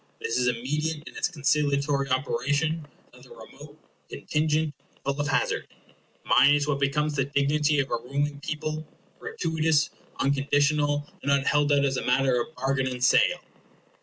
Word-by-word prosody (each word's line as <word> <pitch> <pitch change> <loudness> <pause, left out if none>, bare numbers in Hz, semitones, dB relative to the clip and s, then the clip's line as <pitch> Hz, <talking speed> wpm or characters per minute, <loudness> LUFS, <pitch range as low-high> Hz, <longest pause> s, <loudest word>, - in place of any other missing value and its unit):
This 115 - -3
is 125 0 +1
immediate 150 +6 -2
in - - -11
its - - 0
conciliatory 140 -3 0
operation; 145 +5 -1 0.2
the - - -17
other - - -17
remote, 475 - -13 0.3
contingent, 155 0 -1 0.3
full 140 +1 -1
of 145 - -2
hazard. - - 0 0.6
Mine 145 +1 +5
is 145 0 0
what 140 -2 0
becomes 150 +2 0
the 135 -2 +1
dignity 145 +1 +1
of 135 - -1
a 120 - +1
ruling 140 +4 -3
people 155 +1 -4 0.3
gratuitous, 160 - 0 0.3
unconditional, 145 +1 +1
and 140 - -3
not 140 -1 +2
held 145 0 +2
out 140 -1 +3
as 135 -1 0
a - - -3
matter 125 -1 +2
of 155 - -7
bargain 135 +1 0
and 125 -1 -4
sale. - - +4
145 Hz, 160 wpm, -26 LUFS, 135-150 Hz, 0.6 s, Mine